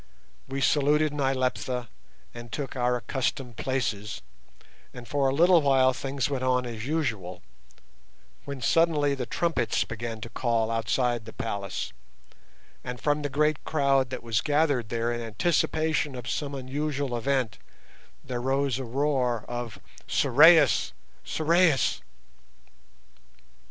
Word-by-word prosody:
We 135 +1 -4
saluted 150 +2 +3
Nyleptha 130 -3 -1 0.5
and 120 -1 -10
took 135 +2 -4
our 125 -1 +1
accustomed 125 -1 -3
places, 115 -6 -2 0.7
and 125 -1 -9
for 140 0 +1
a 135 - -1
little 175 +2 +5
while 135 -2 +4
things 135 0 -2
went 135 -3 -3
on 125 -1 +1
as 115 0 -6
usual, 110 - -2 1.0
when 140 -2 -7
suddenly 150 +1 +3
the 130 -3 -4
trumpets 165 -3 0
began 115 0 -6
to 115 - -6
call 115 -2 0
outside 115 +1 0
the 110 - -10
palace, 100 -4 -4 0.9
and 125 -1 -6
from 150 0 +1
the 145 - -2
great 150 +1 +1
crowd 140 -4 +2
that 130 - -6
was 115 -3 0
gathered 145 -6 +1
there 115 +1 -1
in 120 - -4
anticipation 155 +4 0
of 125 -1 -7
some 145 -2 -3
unusual 140 0 -3
event 120 -2 -1 0.6
there 125 -2 -4
rose 135 0 0
a - - -3
roar 125 -2 0
of 120 -4 -5 0.3
"_Sorais! 155 +5 +5 0.3
Sorais! 160 - +2
130 Hz, 125 wpm, -27 LUFS, 120-145 Hz, 1.0 s, little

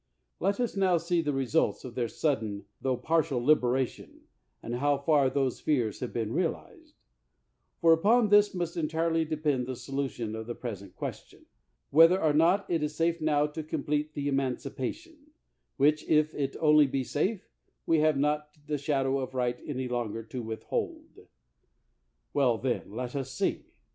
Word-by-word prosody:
Let 200 +4 0
us 245 -3 -1
now 190 -3 +3
see 170 +1 0
the 150 -2 -1
results 135 +2 0
of 125 - -7
their 120 -1 -1
sudden 110 -7 -2 0.2
tho 130 -2 0
partial 145 -1 +1
liberation, 130 -1 +1 0.4
and 120 +1 -3
how 145 +2 +2
far 140 -1 +3
those 135 -2 -1
fears 120 -8 0
have 125 - -4
been 115 -1 -2
realized; 320 - -4 0.9
for 165 -1 +7
upon 215 +7 +3
this 205 -1 +5
must 175 -1 -3
entirely 165 0 0
de 155 0 -3
pend 145 -5 0
the 130 - -3
solution 130 -5 -4
of 110 0 -6
the 120 - -4
present 100 -6 -7
question - - -7 0.2
— - - -49
whether 165 +5 +7
or 155 -4 +2
not 175 +6 +3
it 165 -3 0
is 150 0 -2
safe 165 +1 0
now 150 -1 +2
to 150 +1 -5
complete 150 0 -2
the 145 -1 -2
emancipation, 140 - -3 0.6
which, 150 +2 +3
if 155 0 +3
it 140 -2 -2
only 150 -2 +5
be 135 0 -1
safe, 185 - -2 0.4
we 165 -1 +3
have 155 -1 +3
not 150 +2 -1
the 150 -1 -2
shadow 135 -2 0
of 130 0 -5
right 125 -1 0
any 130 -3 -3
longer 115 -2 -3
to 120 +3 -6
withhold. 110 -1 -5 1.1
Well, 125 -5 +3
then, 125 -4 -2
let 125 +4 -5
us 135 -1 -3
see. 135 - -1
145 Hz, 170 wpm, -29 LUFS, 125-160 Hz, 1.1 s, for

